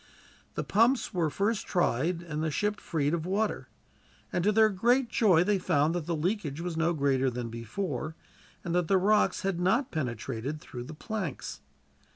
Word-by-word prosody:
The -, -, -1 dB
pumps 235 Hz, +3 st, +2 dB
were 170 Hz, -4 st, +1 dB
first 205 Hz, +7 st, -1 dB
tried 170 Hz, 0 st, +1 dB
and 155 Hz, -2 st, -3 dB
the 160 Hz, -, +1 dB
ship 210 Hz, +7 st, -1 dB
freed 150 Hz, -2 st, 0 dB
of 170 Hz, -2 st, -1 dB
water, 210 Hz, +3 st, -1 dB, 0.7 s
and 175 Hz, -, +1 dB
to 210 Hz, -, +4 dB
their 220 Hz, +1 st, +5 dB
great 240 Hz, +6 st, +2 dB
joy 195 Hz, -8 st, +4 dB
they 200 Hz, +1 st, +1 dB
found 150 Hz, -2 st, +2 dB
that 175 Hz, -3 st, -3 dB
the 170 Hz, -, 0 dB
leakage 160 Hz, -3 st, -2 dB
was 175 Hz, -1 st, -3 dB
no 165 Hz, +1 st, +1 dB
greater 135 Hz, -3 st, +2 dB
than 120 Hz, -1 st, -4 dB
before, 155 Hz, -, -4 dB, 0.5 s
and 170 Hz, -, -3 dB
that 175 Hz, -2 st, +1 dB
the 195 Hz, -, +4 dB
rocks 210 Hz, +3 st, +3 dB
had 190 Hz, -3 st, -1 dB
not 225 Hz, +9 st, +2 dB
penetrated 130 Hz, 0 st, -3 dB
through 125 Hz, -4 st, -8 dB
the 155 Hz, -, -9 dB
planks. 190 Hz, -, -5 dB
170 Hz, 180 wpm, -29 LUFS, 150-205 Hz, 0.7 s, their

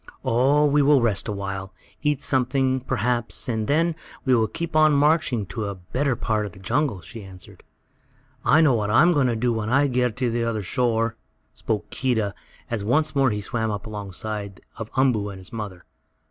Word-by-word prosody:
"Oh, 135 Hz, +6 st, +3 dB
we 145 Hz, 0 st, +3 dB
will 145 Hz, 0 st, +5 dB
rest 110 Hz, -4 st, +1 dB
a -, -, -2 dB
while, 95 Hz, -1 st, -5 dB, 0.3 s
eat 150 Hz, -2 st, 0 dB
something, 130 Hz, 0 st, +1 dB
perhaps, 120 Hz, -1 st, -1 dB
and 110 Hz, -3 st, -1 dB
then 165 Hz, +3 st, +2 dB, 0.3 s
we 130 Hz, -, +3 dB
will 115 Hz, -2 st, +3 dB
keep 170 Hz, +4 st, -5 dB
on 155 Hz, -1 st, +5 dB
marching 145 Hz, -6 st, +2 dB
to 95 Hz, +3 st, -4 dB
a 100 Hz, -1 st, -4 dB
better 125 Hz, +9 st, -1 dB
part 110 Hz, -2 st, -1 dB
of 95 Hz, -, -11 dB
the -, -, -13 dB
jungle," 115 Hz, 0 st, -1 dB
she 105 Hz, +6 st, -9 dB
answered. 95 Hz, -1 st, -13 dB, 0.8 s
"I 155 Hz, -, +5 dB
know 150 Hz, -5 st, +5 dB
what 105 Hz, -3 st, 0 dB
I'm 150 Hz, +11 st, +5 dB
going 145 Hz, -6 st, +3 dB
to 120 Hz, -, 0 dB
do 120 Hz, +1 st, +1 dB
when 110 Hz, -1 st, -2 dB
I 140 Hz, +4 st, +4 dB
get 125 Hz, -3 st, 0 dB
on 125 Hz, -2 st, +1 dB
the 120 Hz, 0 st, 0 dB
other 115 Hz, -3 st, -2 dB
shore," 115 Hz, +1 st, 0 dB, 0.4 s
spoke 105 Hz, -2 st, -3 dB
Keedah, 115 Hz, -6 st, 0 dB, 0.4 s
as 115 Hz, -4 st, -2 dB
once 145 Hz, +7 st, +1 dB
more 135 Hz, -1 st, +4 dB
he 105 Hz, -2 st, -2 dB
swam 110 Hz, +2 st, -2 dB
up 105 Hz, -1 st, -4 dB
along 105 Hz, -3 st, -7 dB
side 100 Hz, -1 st, -5 dB, 0.2 s
of 110 Hz, -1 st, -7 dB
Umboo 120 Hz, -6 st, +2 dB
and 100 Hz, -, -8 dB
his 95 Hz, +2 st, -9 dB
mother. 105 Hz, -5 st, -6 dB
115 Hz, 200 wpm, -24 LUFS, 105-135 Hz, 0.8 s, will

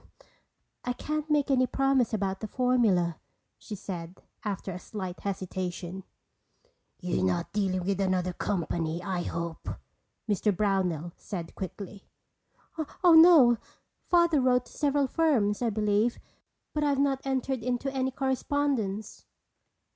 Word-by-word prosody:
"I 250 Hz, -, -1 dB
can't 305 Hz, +4 st, -3 dB
make 295 Hz, -2 st, +2 dB
any 255 Hz, -1 st, +4 dB
promise 270 Hz, -3 st, +2 dB
about 195 Hz, -3 st, -1 dB
the 215 Hz, -, -4 dB
formula," 215 Hz, -9 st, +2 dB, 0.4 s
she 210 Hz, -, -7 dB
said 180 Hz, -2 st, -7 dB, 0.2 s
after 200 Hz, -2 st, -3 dB
a 180 Hz, -, -6 dB
slight 185 Hz, -2 st, -6 dB
hesitation. 185 Hz, -1 st, -4 dB, 0.9 s
"You're 175 Hz, -, -1 dB
not 90 Hz, -2 st, 0 dB
dealing 190 Hz, -3 st, 0 dB
with 200 Hz, 0 st, 0 dB
another 185 Hz, -1 st, 0 dB
company, 170 Hz, -2 st, -2 dB
I 185 Hz, -3 st, -2 dB
hope," 170 Hz, -1 st, -4 dB, 0.6 s
Mr. 205 Hz, -2 st, +1 dB
Brownell 180 Hz, -5 st, 0 dB
said 170 Hz, -4 st, -6 dB
quickly. 195 Hz, +1 st, -8 dB, 0.9 s
"Oh, 350 Hz, -2 st, +7 dB
no. 320 Hz, -8 st, +8 dB, 0.5 s
Father 340 Hz, -4 st, +4 dB
wrote 250 Hz, -1 st, +3 dB
to -, -, -17 dB
several 285 Hz, -1 st, +1 dB
firms, 255 Hz, -9 st, +1 dB
I 240 Hz, -, +2 dB
believe, 210 Hz, +2 st, +1 dB, 0.6 s
but 300 Hz, -, 0 dB
I've 285 Hz, -2 st, +2 dB
not 275 Hz, -1 st, +1 dB
entered 265 Hz, -1 st, -1 dB
into 250 Hz, +3 st, -2 dB
any 265 Hz, -1 st, 0 dB
correspondence." 265 Hz, -5 st, -1 dB
210 Hz, 125 wpm, -28 LUFS, 185-265 Hz, 0.9 s, no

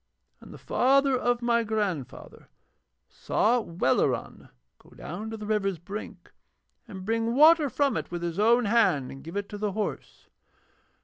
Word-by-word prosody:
And -, -, -14 dB
the -, -, -10 dB
father 275 Hz, +1 st, +2 dB
of 245 Hz, -1 st, 0 dB
my 235 Hz, -1 st, +2 dB
grandfather 205 Hz, -, -4 dB, 0.6 s
saw 240 Hz, +3 st, 0 dB
Welleran 170 Hz, -9 st, -1 dB, 0.3 s
go -, -, -21 dB
down 200 Hz, +8 st, -7 dB
to 225 Hz, -, -6 dB
the 210 Hz, -, -8 dB
river's 200 Hz, -3 st, -1 dB
brink 195 Hz, +6 st, -9 dB, 0.6 s
and 190 Hz, -2 st, -9 dB
bring 230 Hz, +2 st, -1 dB
water 310 Hz, +1 st, +6 dB
from 280 Hz, +1 st, 0 dB
it -, -, -4 dB
with 175 Hz, 0 st, -5 dB
his 170 Hz, +2 st, -3 dB
own 235 Hz, +3 st, +4 dB
hand 205 Hz, -, +2 dB
and 135 Hz, -, -11 dB
give 165 Hz, +5 st, -7 dB
it 200 Hz, 0 st, -3 dB
to 205 Hz, -, -7 dB
the 210 Hz, -2 st, -2 dB
horse. 215 Hz, 0 st, -5 dB
215 Hz, 160 wpm, -27 LUFS, 190-240 Hz, 0.6 s, water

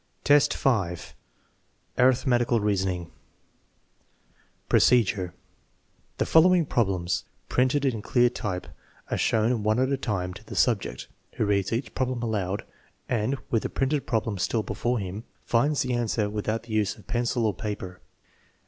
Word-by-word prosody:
XTV, 145 Hz, 0 st, +5 dB
5. 95 Hz, -10 st, -1 dB, 0.9 s
Arithmetical 125 Hz, -2 st, +3 dB
reasoning 95 Hz, -4 st, -1 dB, 1.6 s
Procedure. 105 Hz, -7 st, +3 dB, 0.8 s
The -, -, +1 dB
following 175 Hz, +1 st, +5 dB
problems, 95 Hz, -6 st, 0 dB, 0.2 s
printed 130 Hz, +3 st, +2 dB
in 115 Hz, -5 st, 0 dB
clear 120 Hz, +3 st, +3 dB
type, 105 Hz, -7 st, -3 dB, 0.5 s
are -, -, +1 dB
shown 115 Hz, +1 st, +2 dB
one 110 Hz, +1 st, +1 dB
at 130 Hz, +2 st, +1 dB
a 140 Hz, -, +1 dB
time 95 Hz, -8 st, -2 dB
to 105 Hz, -, -12 dB
the -, -, -9 dB
subject, 115 Hz, -6 st, 0 dB, 0.3 s
who -, -, 0 dB
reads 100 Hz, -1 st, +1 dB
each 115 Hz, +4 st, -2 dB
problem 130 Hz, -2 st, -2 dB
aloud 100 Hz, -4 st, -2 dB, 0.4 s
and 120 Hz, +3 st, 0 dB
(with 115 Hz, -, +2 dB
the -, -, -3 dB
printed 135 Hz, +1 st, -1 dB
problem 110 Hz, -3 st, -1 dB
still 110 Hz, +4 st, 0 dB
before 120 Hz, +3 st, -1 dB
him) 100 Hz, +1 st, -5 dB, 0.2 s
finds 140 Hz, +5 st, +2 dB
the 130 Hz, -1 st, -2 dB
answer 110 Hz, -3 st, 0 dB
without 110 Hz, +1 st, -2 dB
the 115 Hz, -2 st, -8 dB
use 105 Hz, -2 st, +1 dB
of -, -, -17 dB
pencil 120 Hz, -1 st, 0 dB
or 105 Hz, -, +1 dB
paper. 95 Hz, -5 st, -6 dB
115 Hz, 140 wpm, -26 LUFS, 100-125 Hz, 1.6 s, XTV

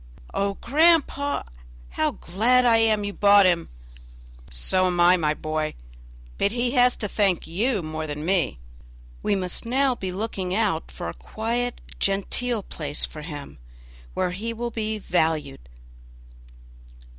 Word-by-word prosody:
"Oh, 200 Hz, 0 st, 0 dB
grandpapa, 290 Hz, 0 st, +2 dB, 0.4 s
how -, -, 0 dB
glad 240 Hz, -, +2 dB
I 230 Hz, -2 st, +5 dB
am 220 Hz, -2 st, +2 dB
you 205 Hz, 0 st, -3 dB
bought 200 Hz, -1 st, +6 dB
him!" 175 Hz, -2 st, +2 dB, 0.8 s
"So 125 Hz, -, +1 dB
am 175 Hz, -1 st, -1 dB
I, 175 Hz, +1 st, +6 dB
my 155 Hz, -3 st, 0 dB
boy; 155 Hz, 0 st, -3 dB, 0.6 s
but 200 Hz, -, +2 dB
he 240 Hz, +1 st, 0 dB
has 250 Hz, -1 st, +4 dB
to 210 Hz, -, -3 dB
thank 195 Hz, -4 st, +1 dB
you 205 Hz, +4 st, 0 dB
more 155 Hz, 0 st, -4 dB
than 150 Hz, +1 st, -5 dB
me; 180 Hz, -, +1 dB, 0.6 s
we 205 Hz, -, +1 dB
must 185 Hz, -2 st, -1 dB
now 260 Hz, +3 st, +2 dB
be 190 Hz, -6 st, -5 dB
looking 190 Hz, -2 st, -3 dB
out 200 Hz, -7 st, 0 dB
for -, -, -6 dB
a 85 Hz, -, -4 dB
quiet, 235 Hz, +2 st, -3 dB, 0.2 s
genteel 205 Hz, +3 st, 0 dB
place 150 Hz, -5 st, -2 dB
for 155 Hz, -, -9 dB
him, 145 Hz, -, -8 dB, 0.6 s
where 180 Hz, -, 0 dB
he 220 Hz, +6 st, -4 dB
will 235 Hz, +1 st, -4 dB
be 220 Hz, -1 st, -2 dB
valued." 160 Hz, -, -1 dB
195 Hz, 145 wpm, -24 LUFS, 165-230 Hz, 0.8 s, bought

